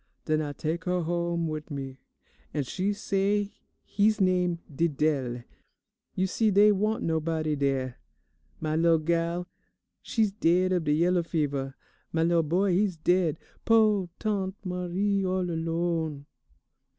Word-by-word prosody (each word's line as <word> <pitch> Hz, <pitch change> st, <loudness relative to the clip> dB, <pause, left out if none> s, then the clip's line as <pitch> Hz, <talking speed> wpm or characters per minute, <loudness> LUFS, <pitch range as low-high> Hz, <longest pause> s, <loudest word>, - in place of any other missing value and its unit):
Den 155 Hz, 0 st, +1 dB
I 145 Hz, -1 st, -3 dB
tak' 165 Hz, +3 st, -3 dB
her 180 Hz, -1 st, 0 dB
home 170 Hz, 0 st, -1 dB
wid 155 Hz, 0 st, -5 dB
me, 135 Hz, -2 st, -6 dB, 0.6 s
and 145 Hz, -3 st, 0 dB
she 190 Hz, +10 st, -1 dB
say 200 Hz, 0 st, 0 dB, 0.3 s
he's 215 Hz, +1 st, +2 dB
name 180 Hz, -2 st, +2 dB, 0.2 s
Didele. 140 Hz, -5 st, 0 dB, 0.7 s
You 185 Hz, -, +1 dB
see 215 Hz, +4 st, +1 dB
dey 205 Hz, +1 st, +6 dB
wa'nt 210 Hz, +2 st, 0 dB
nobody 160 Hz, -1 st, 0 dB
dere. 135 Hz, -3 st, -1 dB, 0.6 s
My 155 Hz, -1 st, -1 dB
lil' 165 Hz, 0 st, +4 dB
gal, 170 Hz, +2 st, -1 dB, 0.5 s
she's 220 Hz, -3 st, 0 dB
daid 185 Hz, -2 st, +2 dB
of 175 Hz, -3 st, 0 dB
de 150 Hz, -, +2 dB
yellow 175 Hz, +3 st, +3 dB
fever; 145 Hz, -5 st, -2 dB, 0.4 s
my 165 Hz, 0 st, +1 dB
lil' 170 Hz, 0 st, +3 dB
boy, 180 Hz, +5 st, +1 dB
he's 190 Hz, -1 st, +1 dB
daid, 170 Hz, -1 st, +2 dB, 0.3 s
po' 215 Hz, -5 st, +3 dB
Tante 200 Hz, -3 st, -2 dB
Marie 185 Hz, +2 st, -1 dB
all 185 Hz, -1 st, 0 dB
alone. 165 Hz, -3 st, -2 dB
170 Hz, 135 wpm, -27 LUFS, 155-190 Hz, 0.7 s, dey